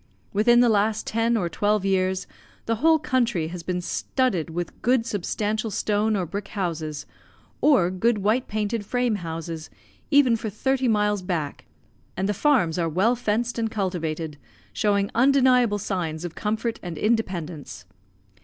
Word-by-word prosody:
Within 240 +4 +5
the 245 - +5
last 215 0 +1
ten 230 +1 +1
or 180 -5 0
twelve 205 +3 0
years 190 -1 +1 0.4
the 230 0 0
whole 320 +6 +5
country 240 - 0
has 175 0 -6
been 180 +1 -2
studded 190 - -1
with 175 +1 -5
good 245 -1 +2
substantial 215 +1 -2
stone 210 +2 0
or 185 -3 -1
brick 200 +5 -5
houses, 160 -7 -4 0.6
or 210 - +4
good 220 +5 +1
white 215 +5 +1
painted 215 +1 -2
frame 245 0 0
houses, 165 -2 -6 0.4
even 280 -5 +5
for 220 -1 -4
thirty 265 +5 0
miles 210 -2 +2
back, 165 -6 -3 0.5
and 190 - 0
the 205 - +1
farms 205 - +2
are 165 -1 +1
well 195 +10 +2
fenced 235 +1 -1
and 225 -1 0
cultivated, 165 -7 -3 0.3
showing 200 -1 +1
undeniable 250 -3 +4
signs 175 -5 -3
of 170 - -5
comfort 220 +2 -2
and 175 -3 -6
independence. 170 - -2
210 Hz, 150 wpm, -24 LUFS, 175-230 Hz, 0.6 s, Within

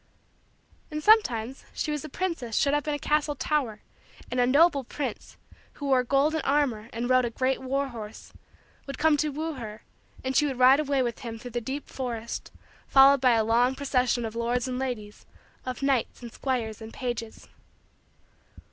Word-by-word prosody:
And 305 -1 -5
sometimes 270 - +3
she 305 - -2
was 295 -2 -3
a - - -7
princess 275 - -3
shut 280 - +2
up 295 0 0
in 300 - 0
a - - -2
castle 295 0 0
tower 260 -7 -1 0.5
and 250 - -1
a 245 - +4
noble 285 +1 +4
prince, 255 -2 -6 0.4
who 290 - -7
wore 260 -2 +3
golden 285 +5 +2
armor 260 -6 0
and 235 +2 -3
rode 255 0 +4
a 240 - 0
great 255 +3 -1
war 275 +1 -1
horse, 220 -3 -9 0.5
would 275 -1 -6
come 315 0 +4
to 305 +1 0
woo 315 +3 -3
her 220 -5 -8 0.4
and 260 0 -2
she 295 - +4
would 265 -3 -3
ride 255 +3 +6
away 280 -3 +1
with 240 -2 -3
him 230 -2 -6
through 245 +2 -9
the 240 +1 -2
deep 270 +5 -5
forest 235 -3 -5 0.4
followed 275 0 +6
by 250 -2 +5
a 225 -1 +3
long 240 +4 +2
procession 255 -3 0
of 220 0 -6
lords 235 +2 0
and 255 0 -3
ladies, 225 -6 -5 0.4
of 255 +2 -4
knights 265 -3 0
and 235 - -8
squires 235 -5 -2
and 220 0 -9
pages. 240 -3 -5
255 Hz, 185 wpm, -27 LUFS, 235-280 Hz, 0.5 s, ride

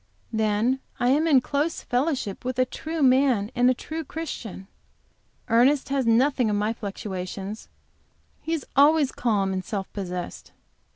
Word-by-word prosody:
Then 220 +4 +1 0.2
I 245 - +2
am 300 +5 +3
in 275 -5 +5
close 295 +5 -1
fellowship 250 -6 -1
with 255 0 -3
a 255 - +4
true 315 +4 -4
man 255 -5 +3
and 245 +1 +4
a 255 - +3
true 320 +5 -5
Christian. 255 - -6 0.8
Ernest 260 +5 +3
has 270 -3 0
none 260 +5 +3
of 210 - +1
my 210 +2 0
fluctuations; 195 -1 -6 0.7
he 325 - -5
is 320 - -2
always 290 0 +5
calm 200 -5 0
and 185 0 -2
self 195 +1 -5
possessed. 180 -3 -6
245 Hz, 150 wpm, -25 LUFS, 205-280 Hz, 0.8 s, in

